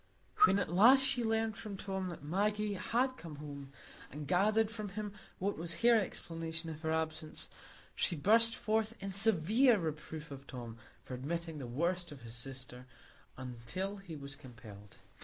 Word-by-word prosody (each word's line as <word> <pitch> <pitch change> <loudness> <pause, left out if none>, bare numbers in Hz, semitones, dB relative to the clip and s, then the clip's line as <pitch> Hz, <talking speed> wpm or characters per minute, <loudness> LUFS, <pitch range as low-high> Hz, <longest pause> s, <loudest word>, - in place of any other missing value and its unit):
When 195 - +3
at 185 -4 -1
last 240 +9 +7
she 255 -2 +2
learned 225 -1 0
from 205 -3 -6
Tom 190 -1 -3
that 170 -5 -7
Maggie 205 +6 0
had 250 +7 0
come 160 -3 -9
home, 140 -2 -8 0.4
and 150 0 -7
gathered 210 +4 +3
from 215 -2 -5
him 205 +1 -5 0.2
what 200 -2 -2
was 165 +4 -4
her 240 0 +7
explanation 165 -6 -1
of 155 0 -9
her 160 -1 -1
absence, 160 -1 -3 0.4
she - - +1
burst 225 +8 +5
forth 220 +1 0
in 195 0 -4
severe 220 - +6
reproof 155 -2 -5
of 140 0 -9
Tom 120 -3 -7 0.3
for - - -8
admitting 160 +4 -4
the 130 - -6
worst 170 +7 -1
of 135 -4 -11
his 115 -1 -8
sister 125 +1 -8 0.5
until 130 +11 -5
he 190 -5 -9
was 140 -1 -7
compelled. 105 -6 -13
170 Hz, 165 wpm, -34 LUFS, 145-210 Hz, 0.5 s, last